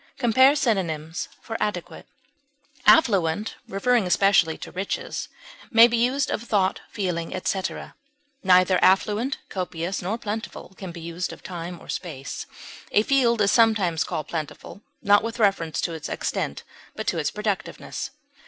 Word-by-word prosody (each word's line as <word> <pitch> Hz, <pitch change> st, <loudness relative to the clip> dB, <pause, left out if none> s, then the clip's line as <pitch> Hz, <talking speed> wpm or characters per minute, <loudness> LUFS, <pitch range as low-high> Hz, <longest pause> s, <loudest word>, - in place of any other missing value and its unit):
(Compare 260 Hz, +3 st, +5 dB
synonyms 170 Hz, -, -1 dB
for 225 Hz, -, -6 dB
ADEQUATE.) 205 Hz, -5 st, -3 dB, 0.8 s
Affluent, 205 Hz, -, +4 dB
referring 210 Hz, +1 st, +1 dB
especially 180 Hz, -4 st, +3 dB
to -, -, -9 dB
riches, 190 Hz, +2 st, -4 dB, 0.4 s
may 230 Hz, -2 st, +8 dB
be 240 Hz, -, -1 dB
used 255 Hz, +4 st, +1 dB
of -, -, -1 dB
thought, 200 Hz, -5 st, 0 dB
feeling, 180 Hz, -3 st, -3 dB
etc. 185 Hz, +1 st, -3 dB, 0.5 s
Neither 185 Hz, -1 st, +4 dB
affluent, 210 Hz, +7 st, +3 dB
copious, 180 Hz, 0 st, -3 dB
nor 200 Hz, +6 st, -2 dB
plentiful 220 Hz, -3 st, -6 dB
can 190 Hz, -2 st, -7 dB
be 170 Hz, 0 st, -9 dB
used 170 Hz, +2 st, -4 dB
of -, -, -12 dB
time 175 Hz, -1 st, -6 dB
or -, -, -15 dB
space; 140 Hz, -7 st, -5 dB, 0.4 s
a 210 Hz, -, +4 dB
field 235 Hz, -4 st, +3 dB
is 200 Hz, -, +4 dB
sometimes 215 Hz, -9 st, +3 dB
called 155 Hz, -1 st, -4 dB
plentiful, 160 Hz, +4 st, -6 dB, 0.2 s
not 205 Hz, 0 st, +5 dB
with 230 Hz, +1 st, -4 dB
reference 195 Hz, -8 st, +1 dB
to 170 Hz, -, -2 dB
its 160 Hz, -2 st, -6 dB
extent, 70 Hz, -, -3 dB, 0.3 s
but -, -, -5 dB
to -, -, 0 dB
its -, -, 0 dB
productiveness. -, -, -4 dB
195 Hz, 145 wpm, -24 LUFS, 170-225 Hz, 0.8 s, may